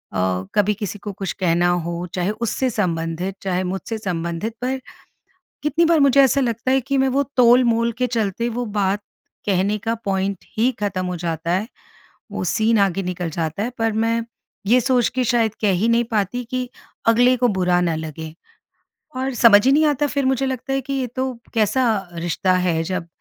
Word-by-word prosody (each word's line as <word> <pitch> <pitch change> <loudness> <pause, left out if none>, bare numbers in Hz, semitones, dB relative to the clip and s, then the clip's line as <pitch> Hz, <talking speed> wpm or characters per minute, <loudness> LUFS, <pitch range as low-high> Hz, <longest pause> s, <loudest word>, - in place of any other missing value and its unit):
अ, 90 0 0
कभी 205 0 +3
किसी 205 -1 -4
को 205 - -6
कुछ 195 -2 -4
कहना 175 -2 +1
हो, 175 0 -2
चाहे 180 +2 0
उससे 260 +3 0
संबंधित, 175 -2 -2
चाहे 185 -1 -1
मुझसे 195 +5 -4
संबंधित 175 +1 -3
पर, 260 +1 -1 0.8
कितनी 315 +3 +2
बार 325 -2 +4
मुझे 275 0 +5
ऐसा 270 +1 +3
लगता 235 +1 -1
है 265 0 +3
कि 275 +2 -1
मैं 265 0 +3
वो 280 - +3
तोलमोल 235 -1 +4
के 250 - +1
चलते, 230 -1 -1
वो 245 +1 -3
बात 205 -2 0 0.5
कहने 200 +1 +1
का 225 +3 -2
पॉइंट 195 -1 -1
ही 240 +4 +3
ख़त्म 195 -3 -2
हो 180 0 -3
जाता 165 0 -3
है। 190 +5 0 0.6
वो - - -3
सीन 220 0 +2
आगे 195 -1 +1
निकल 180 -1 -3
जाता 160 +4 -3
है 240 - -1
पर 225 0 +1
मैं, 230 +1 0 0.4
ये 245 +3 +5
सोच 250 -1 +2
के 255 - +1
शायद 225 -3 +1
कह 210 -2 +3
ही 225 - +2
नहीं 235 +1 +3
पाती 220 +3 -1
कि 255 -1 -2 0.4
अगले 245 +2 +4
को 245 0 +3
बुरा 180 -1 +3
ना 170 -2 0
लगे। 160 0 -6 0.8
और 260 +1 -2
समझ 205 -3 +8
ही 265 - +5
नहीं 310 +2 +4
आता 295 0 +1
फिर 280 -1 -1
मुझे 265 0 +1
लगता 260 +1 -3
है 270 - +1
कि 270 +1 -6
ये 265 -2 -1
तो, 260 +2 -3 0.2
कैसा 220 -2 +1
रिश्ता 175 +2 0 0.2
है 165 -1 +1
जब, 180 0 -3
215 Hz, 190 wpm, -21 LUFS, 180-250 Hz, 0.8 s, समझ